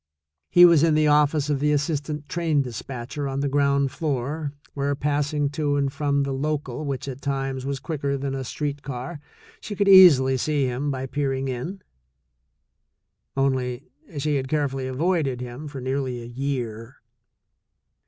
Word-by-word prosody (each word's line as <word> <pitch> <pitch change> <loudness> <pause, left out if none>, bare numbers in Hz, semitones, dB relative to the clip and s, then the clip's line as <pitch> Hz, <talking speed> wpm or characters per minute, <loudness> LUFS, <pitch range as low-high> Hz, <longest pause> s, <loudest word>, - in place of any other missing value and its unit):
He 175 0 +8
was 170 -4 +6
in 160 -1 +4
the 155 0 +3
office 150 0 +3
of 140 - 0
the 150 +1 +2
assistant 150 0 -1
train 160 -4 +1
despatcher 125 +3 -5
on 135 0 -2
the 140 - 0
ground 140 -1 +2
floor, 145 +1 -2 0.2
where 140 0 -1
passing 145 +1 0
to 145 -1 0
and 140 -1 0
from 140 -1 +1
the 140 - -2
local, 145 0 -2
which, 140 -1 -3
at 135 0 -6
times, 135 -1 -2
was 140 -1 -2
quicker 140 -2 -2
than 135 0 -3
a 135 -1 -3
street 145 +2 -4
car, 140 +3 -6 0.4
she 205 - -6
could 200 0 +1
easily 150 -9 +8
see 145 +1 0
him 130 +3 -2
by 135 -1 -3
peering 135 -1 -2
in; 165 +10 -5 1.5
only, 130 -1 -1 0.3
she 145 0 0
had 130 -1 -3
carefully 135 -2 -1
avoided 140 -1 0
him 125 +4 -7
for 140 -2 -7
nearly 130 -1 -2
a 120 - -8
year. 120 -2 -4
140 Hz, 160 wpm, -24 LUFS, 130-150 Hz, 1.5 s, He